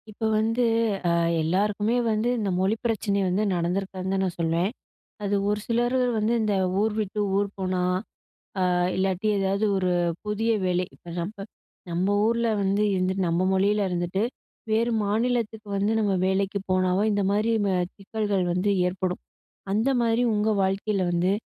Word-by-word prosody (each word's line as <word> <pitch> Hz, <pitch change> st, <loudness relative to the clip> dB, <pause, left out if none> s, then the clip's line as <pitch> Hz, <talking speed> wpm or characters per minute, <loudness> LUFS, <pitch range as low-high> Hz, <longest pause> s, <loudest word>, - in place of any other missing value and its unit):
இப்ப 220 Hz, +1 st, -3 dB
வந்து, 225 Hz, +3 st, +1 dB, 0.4 s
அ -, -, +3 dB, 0.3 s
எல்லாருக்குமே 205 Hz, +7 st, +1 dB, 0.2 s
வந்து 215 Hz, +3 st, +1 dB
இந்த 210 Hz, -3 st, -1 dB
மொழி 190 Hz, +4 st, +2 dB
பிரச்சனை 210 Hz, -3 st, 0 dB
வந்து 185 Hz, +4 st, +1 dB
நடந்திருக்காதுன்னு 185 Hz, +2 st, -2 dB
தான் 190 Hz, 0 st, +1 dB
நான் 180 Hz, -, -4 dB
சொல்வேன். 170 Hz, +4 st, +1 dB, 0.5 s
அது 205 Hz, 0 st, 0 dB
ஒரு 210 Hz, 0 st, 0 dB
சிலரு 240 Hz, +2 st, +1 dB, 0.2 s
வந்து 215 Hz, +2 st, +1 dB
இந்த 215 Hz, -2 st, +1 dB, 0.3 s
ஊர் 215 Hz, 0 st, +1 dB
விட்டு 210 Hz, 0 st, -2 dB, 0.2 s
ஊர் 200 Hz, 0 st, +1 dB
போனா, 185 Hz, -1 st, -1 dB, 0.8 s
அ -, -, +2 dB, 0.3 s
இல்லாட்டி 190 Hz, +2 st, 0 dB
ஏதாவது 195 Hz, +2 st, +1 dB
ஒரு 185 Hz, -1 st, +1 dB, 0.3 s
புதிய 215 Hz, +2 st, 0 dB
வேலை 180 Hz, 0 st, +1 dB
இப்ப 170 Hz, +4 st, -11 dB
நம்ப 200 Hz, +6 st, -5 dB, 0.5 s
நம்ம 185 Hz, +4 st, +1 dB
ஊர்ல 235 Hz, +1 st, +1 dB
வந்து 200 Hz, +2 st, +1 dB
இருந்துட்டு, 185 Hz, 0 st, 0 dB
நம்ம 170 Hz, +2 st, +1 dB
மொழியில 200 Hz, +2 st, +2 dB
இருந்துட்டு 175 Hz, +3 st, -1 dB, 0.5 s
வேறு 230 Hz, +2 st, +2 dB
மாநிலத்துக்கு 220 Hz, 0 st, -1 dB
வந்து 200 Hz, +2 st, +1 dB
நம்ம 205 Hz, -3 st, +1 dB
வேலைக்கு 195 Hz, +1 st, 0 dB
போனாவோ, 185 Hz, +1 st, +2 dB
இந்த 205 Hz, 0 st, +1 dB
மாரி 210 Hz, +3 st, +1 dB
ம -, -, +1 dB, 0.3 s
சிக்கல்கள் 205 Hz, -1 st, -1 dB
வந்து 185 Hz, +3 st, +1 dB, 0.2 s
ஏற்படும். 180 Hz, 0 st, -3 dB, 0.5 s
அந்த 220 Hz, +6 st, +2 dB
மாரி 230 Hz, +1 st, +2 dB
உங்க 210 Hz, +1 st, +1 dB
வாழ்க்கையில 195 Hz, +1 st, 0 dB
வந்து, 175 Hz, +2 st, +1 dB
200 Hz, 150 wpm, -25 LUFS, 185-215 Hz, 0.8 s, அ